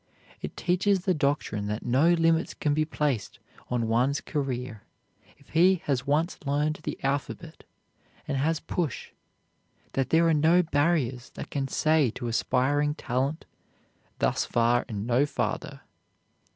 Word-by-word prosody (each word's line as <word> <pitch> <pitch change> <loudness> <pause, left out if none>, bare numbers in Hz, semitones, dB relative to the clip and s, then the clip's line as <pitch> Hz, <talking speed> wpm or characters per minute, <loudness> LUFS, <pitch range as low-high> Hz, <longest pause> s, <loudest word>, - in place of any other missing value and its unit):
It - - -7
teaches 185 +2 +1
the 185 - +3
doctrine 140 -9 -1
that 105 +1 -4
no 140 +8 +4
limits 165 -1 +2
can 150 -2 0
be 155 +1 +1
placed 150 -7 -2 0.3
on 120 -2 0
one's 125 +5 +2
career 130 -7 -4 0.6
if 140 - -24
he 180 +2 +4
has 135 -1 -1
once 155 +5 +1
learned 150 +2 0
the - - -4
alphabet 140 +4 -3 0.6
and 145 - -1
has 155 +3 +1
push; 165 -3 -3 0.8
that 135 -1 0
there 165 +1 +4
are 165 - +4
no 160 +4 +4
barriers 145 -5 0
that - - -7
can 135 -2 -1
say 155 -1 +2
to 120 - -4
aspiring 140 +5 +1
talent, 135 +6 -2 0.7
"Thus - - +1
far, 120 +1 +2
and 105 -2 -4
no 125 +4 +2
farther." 145 0 -3
145 Hz, 140 wpm, -27 LUFS, 125-160 Hz, 0.8 s, no